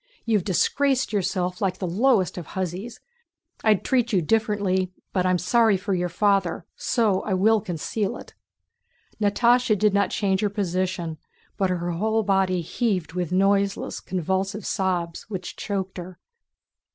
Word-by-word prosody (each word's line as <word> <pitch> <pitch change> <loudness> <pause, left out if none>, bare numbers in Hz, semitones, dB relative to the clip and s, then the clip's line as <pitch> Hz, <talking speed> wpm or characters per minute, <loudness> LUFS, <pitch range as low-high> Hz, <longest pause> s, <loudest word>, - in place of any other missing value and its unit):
You've 215 -5 +2
disgraced 260 - +1
yourself 185 0 -1
like 190 -2 0
the 190 - -3
lowest 200 +2 +2
of 170 - -9
hussies. 190 +5 -4 0.6
I'd 215 -3 +3
treat 245 -3 +1
you 195 - +3
differently, 195 -1 +1 0.2
but 185 -1 +1
I'm 185 0 +3
sorry 220 +3 +3
for 195 +1 -3
your 180 -1 0
father, 200 +2 +1
so 215 -6 +1
I 195 - -1
will 215 +3 +3
conceal 190 +2 -3
it." - - -12 0.9
Natásha 235 +2 +3
did 210 +1 +3
not 200 0 +2
change 195 -2 0
her 210 - +1
position, 185 -4 -2 0.4
but 195 -3 0
her 175 -1 -1
whole 220 +6 0
body 190 -2 +1
heaved 180 -3 -1
with 180 -2 -2
noiseless, 195 +1 +1
convulsive 190 +3 -2
sobs 180 -2 -2
which 185 -4 -5
choked 190 -2 -4
her. 180 0 -9
195 Hz, 145 wpm, -24 LUFS, 180-215 Hz, 0.9 s, I'd